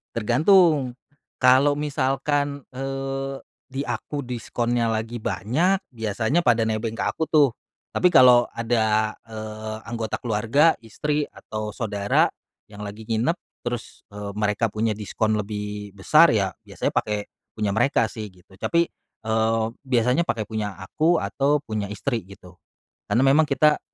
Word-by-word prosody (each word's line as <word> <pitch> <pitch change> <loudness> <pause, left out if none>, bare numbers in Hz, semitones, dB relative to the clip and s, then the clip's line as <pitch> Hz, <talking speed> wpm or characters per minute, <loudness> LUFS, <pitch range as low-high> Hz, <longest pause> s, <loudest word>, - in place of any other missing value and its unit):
Tergantung, 135 - +3 0.4
kalau 135 +3 +5
misalkan, 145 0 -1
eee, 135 +1 -4 0.3
di 135 +2 -4
aku 145 -3 -4
diskonnya 120 -1 -1
lagi 110 +1 -3
banyak 165 - +1 0.2
biasanya 110 - 0
pada 115 -5 +3
nebeng 110 +1 -2
ke - - -1
aku 160 - -2
tuh. 145 -4 +5 0.4
Tapi 180 - +4
kalo 125 -5 +6
ada, 110 -2 +1 0.2
eee, 110 0 -6
anggota 115 -2 -3
keluarga, 120 +8 +3
istri, 145 +6 -2
atau 110 0 -6
saudara 105 -3 +1 0.4
yang 105 0 -12
lagi 105 +2 -7
nginep 115 +11 0 0.2
terus, 120 -1 -5
eee, 100 0 -6
mereka 105 +1 0
punya 110 -1 0
diskon 110 +1 -1
lebih 105 -1 -5
besar 150 - +5
ya 100 -3 +2 0.2
biasanya - - -2
pake 105 -1 -1 0.2
punya 105 -2 -1
mereka 115 -1 +2
sih 110 -3 -6
gitu. 90 +1 -20
Tapi, 170 - +1 0.4
eee, 110 0 +1 0.2
biasanya 125 +5 +2
pake 110 -7 -2
punya 105 -2 -3
aku 160 - +1
atau 140 +8 +1
punya 110 -6 -3
istri 120 -3 -2
gitu. 90 -2 -15 0.5
Karena 130 +3 +3
memang 150 +3 +4
kita 150 +2 +3
115 Hz, 135 wpm, -24 LUFS, 110-135 Hz, 0.5 s, kalo